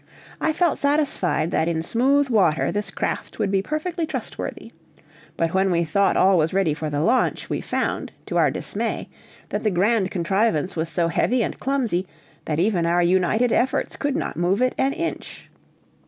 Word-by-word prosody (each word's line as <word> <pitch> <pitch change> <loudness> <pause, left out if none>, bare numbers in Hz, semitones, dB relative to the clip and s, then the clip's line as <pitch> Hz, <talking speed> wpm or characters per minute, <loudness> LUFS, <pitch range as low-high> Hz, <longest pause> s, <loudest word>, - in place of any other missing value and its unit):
I 315 - +2
felt 335 0 +1
satisfied 280 - +1
that 160 - +1
in 160 -1 -1
smooth 270 +8 +2
water 190 -8 +2
this 205 -1 -3
craft - - -4
would 195 - 0
be 195 -1 +2
perfectly 315 - -3
trustworthy. - - -6 0.7
But 165 0 0
when 190 +1 +2
we 170 -1 +2
thought 195 +5 +2
all 190 -1 +5
was 160 +3 0
ready 190 -6 +2
for 155 0 -4
the 145 0 -1
launch, 245 +9 +1
we - - -1
found, - - -2
to - - -5
our - - +4
dismay, - - -3 0.4
that - - -2
the 215 - +3
grand 195 +2 +2
contrivance 190 -1 0
was 160 0 -2
so 170 -1 0
heavy 240 +7 +1
and - - -4
clumsy, 240 -10 -1 0.4
that 155 0 -1
even 180 -3 +1
our 175 +1 +3
united 190 +7 +2
efforts 260 +2 0
could 285 -1 -2
not - - -3
move 180 +4 +1
it 255 0 +2
an 270 +1 +2
inch. 335 -1 -5
195 Hz, 180 wpm, -23 LUFS, 170-255 Hz, 0.7 s, all